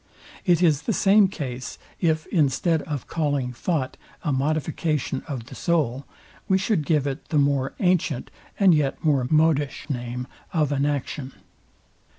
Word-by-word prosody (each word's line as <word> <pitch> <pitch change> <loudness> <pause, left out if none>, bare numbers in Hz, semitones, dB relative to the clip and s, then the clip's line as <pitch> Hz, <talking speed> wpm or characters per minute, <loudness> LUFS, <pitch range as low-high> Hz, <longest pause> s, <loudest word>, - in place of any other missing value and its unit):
It 175 0 +4
is 155 -4 +4
the 225 - -1
same 200 +1 +5
case, 130 -9 -6 0.2
if 160 -3 +1
instead 160 0 +2
o 150 -2 -1
calling 145 -6 -1
thought 135 0 -2 0.3
a 150 - 0
modification 150 0 -1
of 130 -6 -5
the - - -12
soul, 140 -6 0 0.4
we 190 - +4
should 190 -6 0
give 150 -4 +2
it 135 -1 -4
the 155 - +1
more 140 -2 +2
antient, 170 -8 +1 0.3
and 195 -3 +6
yet 145 -3 0
more 140 -5 +3
modish 155 -3 +2
name 125 -1 -4 0.3
of 155 -4 +1
an 140 0 +1
action. 140 -1 -3
150 Hz, 150 wpm, -24 LUFS, 135-165 Hz, 0.4 s, and